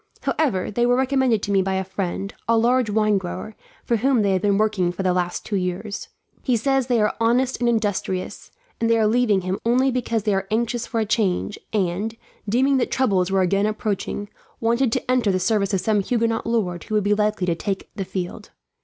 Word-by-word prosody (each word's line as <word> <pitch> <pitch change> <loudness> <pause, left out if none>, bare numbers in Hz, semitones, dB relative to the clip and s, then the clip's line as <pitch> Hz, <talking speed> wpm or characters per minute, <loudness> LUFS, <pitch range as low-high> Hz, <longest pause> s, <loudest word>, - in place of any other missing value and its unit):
However, 225 -14 0
they 240 +3 0
were 245 - +4
recommended 260 -4 +2
to 205 - -2
me 195 -1 +4
by 190 0 -1
a 190 - 0
friend, 190 +1 -4
a 230 0 +3
large 240 0 +2
wine 215 -1 +2
grower, 190 +4 -6 0.3
for 235 - +1
whom 250 0 +2
they 200 - +2
have 190 -1 +1
been 200 -1 +2
working 210 -5 +1
for 180 +2 -4
the 185 -1 +2
last 180 -1 -2
two 205 - -1
years. 190 +3 -3 0.3
He 250 -3 +1
says 270 +2 +1
they 245 -3 +2
are 210 0 +1
honest 245 +3 +2
and 240 -1 +2
industrious, 205 -4 -2 0.3
and 230 - +1
they 230 - +4
are 220 - +3
leaving 215 -3 +3
him 185 +1 -3
only 255 +3 +3
because 230 -3 -1
they 210 -2 +1
are 195 0 -1
anxious 235 +2 -1
for 230 - -2
a 220 - +1
change 205 -2 0
and, 205 +2 -1 0.3
deeming 265 +5 +3
that 255 - 0
troubles 195 -8 +1
were 190 0 +2
again 195 +3 +2
approaching, 205 -1 -3 0.3
wanted 235 +2 +1
to - - -1
enter 245 -5 +2
the 185 - 0
service 200 0 +1
of 195 -3 0
some 215 -2 +2
Huguenot 230 +1 0
lord 190 -7 -1
who 215 - -3
would 210 - +2
be 205 +1 +2
likely 210 -2 0
to 175 - +1
take 195 +3 -4
the 200 - -2
field. 185 +2 -5
215 Hz, 215 wpm, -22 LUFS, 195-235 Hz, 0.3 s, were